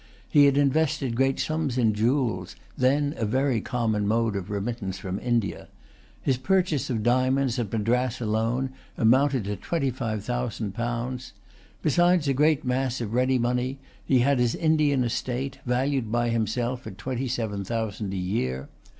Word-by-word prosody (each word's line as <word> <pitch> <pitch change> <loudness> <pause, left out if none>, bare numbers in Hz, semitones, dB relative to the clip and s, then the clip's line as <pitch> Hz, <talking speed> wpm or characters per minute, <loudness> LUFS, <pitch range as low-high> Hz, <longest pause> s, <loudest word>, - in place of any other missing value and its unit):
He 145 -1 +6
had 140 0 +4
invested 140 -3 +1
great 135 +2 +2
sums 155 -5 -1
in 115 -3 +3
jewels, 110 -5 0 0.2
then 140 +3 +2
a - - -2
very 130 +1 +1
common 110 -4 -1
mode 115 0 +1
of 95 0 -4
remittance 100 -2 -3
from 95 +1 -4
India. 115 -8 -1 0.6
His 130 -2 +2
purchases 180 -2 +1
of 115 -4 -1
diamonds, 130 +1 +2
at 110 -5 -2
Madras 120 +3 0
alone, 115 +4 0 0.3
amounted 130 +2 +3
to 100 +1 -3
twenty 140 - -1
five 110 -5 -3
thousand 120 -3 -3
pounds. 120 +3 -3 0.5
Besides 175 +1 +3
a 135 - +3
great 150 +1 +2
mass 125 0 0
of 115 -2 -4
ready 130 +1 +3
money, 125 +2 0 0.3
he 130 - +3
had 135 +1 +3
his 120 -1 +2
Indian 150 -4 +2
estate, 130 +3 -3
valued 125 -2 0
by 120 0 +1
himself 120 +2 -1
at 95 - -8
twenty 130 +4 -3
seven 110 -5 -2
thousand 110 -1 -3
a 95 - -3
year. 90 - -2
125 Hz, 160 wpm, -26 LUFS, 110-135 Hz, 0.6 s, He